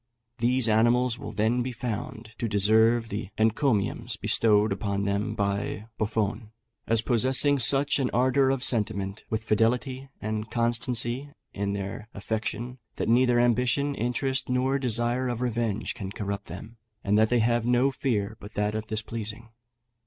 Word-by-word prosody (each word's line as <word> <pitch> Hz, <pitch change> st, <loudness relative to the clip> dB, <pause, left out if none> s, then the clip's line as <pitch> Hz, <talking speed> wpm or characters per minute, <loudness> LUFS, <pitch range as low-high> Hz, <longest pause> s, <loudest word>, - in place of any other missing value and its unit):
These 125 Hz, +1 st, +2 dB
animals 120 Hz, +2 st, +3 dB
will -, -, -6 dB
then 110 Hz, +4 st, +1 dB
be 130 Hz, +1 st, -3 dB
found 110 Hz, -1 st, -5 dB
to 115 Hz, -, -1 dB
deserve 110 Hz, +3 st, +3 dB
the 100 Hz, 0 st, -4 dB
encomiums 110 Hz, 0 st, +1 dB
bestowed 105 Hz, -1 st, +3 dB
upon 100 Hz, 0 st, -2 dB
them 100 Hz, +1 st, -1 dB
by 100 Hz, +1 st, -2 dB
Buffon, 110 Hz, +1 st, -1 dB, 0.4 s
"as 115 Hz, -1 st, +3 dB
possessing 130 Hz, +4 st, +2 dB
such 140 Hz, +3 st, +3 dB
an 130 Hz, -2 st, +1 dB
ardour 130 Hz, +2 st, +3 dB
of 135 Hz, -1 st, 0 dB
sentiment, 105 Hz, -5 st, 0 dB
with 110 Hz, 0 st, -2 dB
fidelity 125 Hz, +5 st, 0 dB
and 110 Hz, +1 st, -4 dB
constancy 120 Hz, +3 st, 0 dB, 0.2 s
in 100 Hz, 0 st, -2 dB
their 100 Hz, +2 st, -5 dB
affection, 110 Hz, +4 st, -4 dB, 0.2 s
that -, -, -2 dB
neither 120 Hz, 0 st, +4 dB
ambition, 125 Hz, +4 st, +2 dB
interest, 130 Hz, +2 st, -2 dB
nor 130 Hz, +2 st, +1 dB
desire 120 Hz, 0 st, 0 dB
of 120 Hz, -2 st, -3 dB
revenge, 115 Hz, -3 st, -2 dB
can 100 Hz, -5 st, -6 dB
corrupt 100 Hz, -1 st, -5 dB
them, 105 Hz, +7 st, -9 dB, 0.3 s
and 100 Hz, 0 st, +1 dB
that 110 Hz, 0 st, +4 dB
they 125 Hz, -, +2 dB
have 120 Hz, 0 st, +1 dB
no 125 Hz, +3 st, +3 dB
fear 110 Hz, -6 st, -2 dB
but 105 Hz, +1 st, -12 dB
that 105 Hz, 0 st, 0 dB
of 110 Hz, 0 st, -4 dB
displeasing. 110 Hz, +1 st, -4 dB
115 Hz, 150 wpm, -27 LUFS, 105-125 Hz, 0.4 s, neither